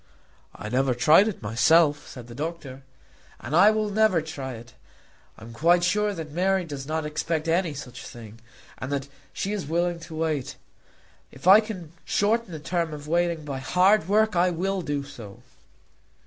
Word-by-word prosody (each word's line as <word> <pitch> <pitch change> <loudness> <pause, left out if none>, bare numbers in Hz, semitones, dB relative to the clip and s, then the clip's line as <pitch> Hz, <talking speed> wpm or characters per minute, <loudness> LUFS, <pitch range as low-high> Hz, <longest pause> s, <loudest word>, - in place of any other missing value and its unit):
"I - - -7
never 130 +1 +1
tried 155 - +5
it 205 - -5
myself," 145 +8 +3
said 125 -3 -10
the 120 - -11
doctor. 145 -2 -6 0.6
"And 130 +6 -4
I 185 +4 +7
never 215 -1 +1
will 160 - -1
try 135 -5 -6
it. 120 +1 -12 0.6
I - - -13
am 115 +1 -10
quite 175 +7 +3
sure 210 +4 +1
that 160 -6 -7
Mary 185 +3 +1
does 140 -4 -7
not 160 0 -2
expect 155 +1 -2
any 165 -2 +1
such 125 -4 -9
thing, 115 -1 -11 0.4
and 130 - -5
that 140 -1 -2 0.2
she 200 - -3
is 195 -8 -4
willing 170 +2 0
to 165 -1 -10
wait. 155 -4 -2 0.8
If 135 - -14
I 195 +3 +9
can 195 -8 -7
shorten 220 0 0
the 160 - -6
term 165 0 -2
of 145 0 -10
waiting 170 -1 0
by 140 -2 -4
hard 180 +6 +3
work, 215 0 +3
I 175 +1 +3
will 190 +3 -2
do 145 -3 -3
so." 120 -9 -12
160 Hz, 175 wpm, -25 LUFS, 140-180 Hz, 0.8 s, I